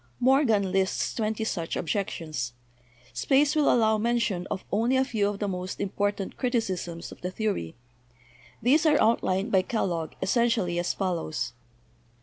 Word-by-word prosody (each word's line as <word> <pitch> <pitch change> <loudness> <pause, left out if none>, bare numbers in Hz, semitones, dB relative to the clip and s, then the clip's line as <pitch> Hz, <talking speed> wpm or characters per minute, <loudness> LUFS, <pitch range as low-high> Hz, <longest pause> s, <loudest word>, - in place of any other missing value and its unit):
Morgan 240 -7 +3
lists 190 0 0
twenty 220 0 -1
such 170 -6 -2
objections. 155 - -3 0.6
Space 285 +2 +2
will 300 -2 +4
allow 220 -2 +3
mention 215 -6 0
of 185 - -4
only 235 +6 +2
a 260 - +3
few 215 -6 0
of 205 - -4
the 205 - -2
most 185 -1 -4
important 200 0 -2
criticisms! 190 -9 -2
of - - -12
the 180 - -2
theory. 195 - -2 0.9
These 300 +7 +4
are 300 -1 +4
outlined 210 -1 +2
by 190 - +5
Kellogg 175 -6 -2
essentially 220 -6 +1
as 175 - 0
follows. 160 - -2
205 Hz, 140 wpm, -27 LUFS, 180-235 Hz, 0.9 s, by